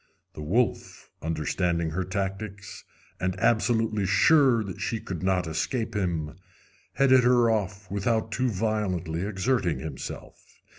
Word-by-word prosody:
The - - -8
wolf, 110 +11 -1
understanding 80 +1 -1
her 95 +4 -1
tactics, 100 +2 -5 0.3
and 95 0 -2
absolutely 110 -3 +2
sure 125 - +4
that 95 -3 -7
she 115 - -2
could 90 -6 -6
not 95 -1 +1
escape 80 +10 -2
him, 85 -5 -2 0.6
headed 130 -2 +5
her 120 -1 +4
off 100 -3 -3
without 110 +3 0
too 125 +3 0
violently 95 -6 -1
exerting 105 -2 0
himself. 75 -4 -8
100 Hz, 120 wpm, -26 LUFS, 90-115 Hz, 0.6 s, headed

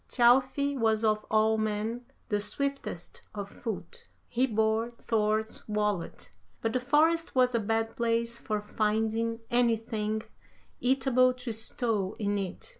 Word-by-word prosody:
Thjalfi 265 +3 +3
was 220 -3 +1
of 215 -1 +1
all 220 0 +3
men 215 +3 -2 0.2
the 205 - +1
swiftest 275 -5 -3
of 200 -1 -4
foot. 365 - -7 0.2
He 250 +2 +1
bore 220 0 +1
Thor's 215 0 0
wallet, 210 -4 -2 0.3
but 225 0 -1
the 255 - +2
forest 310 +6 +2
was 250 -1 +4
a 235 - +2
bad 225 +1 -1
place 235 0 0
for 215 -1 -2
finding 220 +2 0
anything 225 -2 +1 0.6
eatable 255 -1 +3
to 250 -1 -5
stow 220 -3 0
in 205 -1 0
it. 190 -2 -5
225 Hz, 130 wpm, -29 LUFS, 215-250 Hz, 0.6 s, was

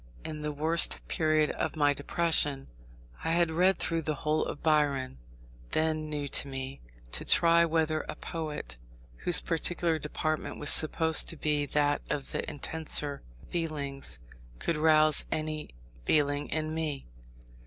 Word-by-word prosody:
In 150 -1 -6
the 150 0 -3
worst 160 +3 +4
period 155 -1 +1
of 160 - -3
my 145 -2 +3
depression, 145 -1 +2 0.6
I - - -1
had 170 -1 +2
read 180 +4 +3
through 165 -1 -1
the 155 -1 -2
whole 155 +2 0
of - - -6
Byron 140 - +1 0.5
(then 155 -1 0
new 145 -1 -3
to 140 - -1
me), 135 0 -6 0.3
to - - -1
try 170 0 +5
whether 160 -1 0
a - - -4
poet, 150 - -6 0.4
whose 175 - +2
peculiar 165 -1 -1
department 155 +1 -3
was 150 - -1
supposed 160 +1 +4
to 165 - -2
be 150 -1 0
that 145 0 +1
of 140 -2 -3
the - - -3
intenser 150 -1 0 0.3
feelings, 145 - -4 0.4
could 165 - -1
rouse 155 0 +5
any 155 -1 -3 0.3
feeling 145 - +1
in 155 0 -2
me. 155 -4 -3
155 Hz, 145 wpm, -29 LUFS, 145-160 Hz, 0.6 s, try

